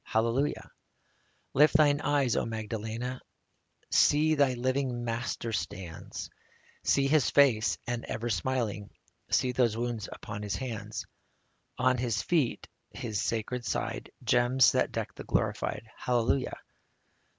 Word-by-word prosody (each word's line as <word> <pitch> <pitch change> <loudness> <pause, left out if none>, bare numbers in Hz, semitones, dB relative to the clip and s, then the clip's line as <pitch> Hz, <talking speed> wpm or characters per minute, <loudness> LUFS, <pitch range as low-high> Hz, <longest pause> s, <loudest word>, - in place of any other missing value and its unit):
Hallelujah! 115 +6 0 0.8
Lift 150 +3 +5
thine 145 -2 +5
eyes, 140 -4 +2
O - - +1
Magdalena! 115 +3 -4 0.7
See! 155 +2 +4
thy 140 -4 +3
living 130 0 -1
Master 115 0 -3
stands; 90 -6 -5 0.5
See 140 - +3
His 140 -2 +3
face, 125 -6 +4
as 120 -1 -1
ever, 115 +2 -3
smiling; 105 0 -1 0.4
See 125 0 +2
those 120 -3 +2
wounds 115 -3 -3
upon 105 0 -7
His 105 -1 -2
hands, 120 -5 -5 0.7
On 130 -1 +2
His 120 -3 0
feet, 155 -9 0 0.2
His 110 -2 -3
sacred 115 +2 -2
side, - - -3
— - - -20
Gems 125 0 +4
that - - +1
deck - - -3
the - - -9
Glorified, 115 - -1
— - - -25
Hallelujah 125 +1 0
120 Hz, 130 wpm, -29 LUFS, 110-130 Hz, 0.8 s, Lift